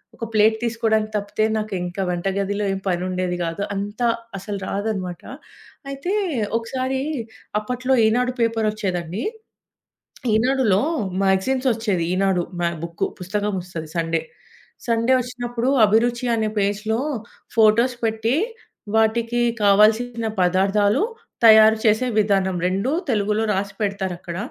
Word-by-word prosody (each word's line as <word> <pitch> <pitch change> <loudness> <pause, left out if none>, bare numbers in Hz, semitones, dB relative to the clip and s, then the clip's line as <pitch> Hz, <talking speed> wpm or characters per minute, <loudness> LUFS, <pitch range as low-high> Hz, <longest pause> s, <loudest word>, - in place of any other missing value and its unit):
ఒక 230 - -5
ప్లేట్ 220 +1 +4
తీసుకోవడానికి 220 -2 0
తప్పితే, 205 +1 -1
నాకు 215 -1 -4
ఇంకా 180 +2 -4
వంటగదిలో 195 +3 -1
ఏం 195 - -3
పని 175 0 0
ఉండేది 180 -1 -2
కాదు. 165 +5 -3
అంత 205 +3 -5 0.4
అసలు 200 0 -5
రాదన్నమాట. 195 -4 -3 0.7
అయితే 290 +8 -3 0.5
ఒకసారి 260 +3 -2 0.6
అప్పట్లో 255 +3 0
ఈనాడు 250 +3 +2
పేపరొచ్చేది 215 -5 0
అండి. 180 +9 -5 1.1
ఈనాడులో 235 -3 +2 0.4
మాగజైన్సొచ్చేది. 215 -1 +1
ఈనాడు 190 -2 +2 0.4
బుక్కు. 170 0 -2
పుస్తకమొస్తది 180 -4 -3
సండే. 165 -1 0 0.7
సండే 230 +3 +3
వచ్చినప్పుడు. 245 0 -3 0.2
అభిరుచి 235 +3 +1
అనే 220 -1 0
పేజ్‌లో, 210 +3 0 0.6
ఫొటోస్ 230 +3 +4
పెట్టి 225 +4 0 0.6
వాటికి 230 +2 +2 0.2
కావాల్సిన 220 +3 +3
పదార్థాలు, 200 - +2 0.4
తయారు 220 0 +8
చేసే 220 +4 +3
విధానం 195 -3 +1
2 195 +8 0 0.2
తెలుగులో 210 0 +1
రాసి 195 0 -2
పెడతారక్కడ. 190 -4 -3
215 Hz, 105 wpm, -22 LUFS, 195-230 Hz, 1.1 s, తయారు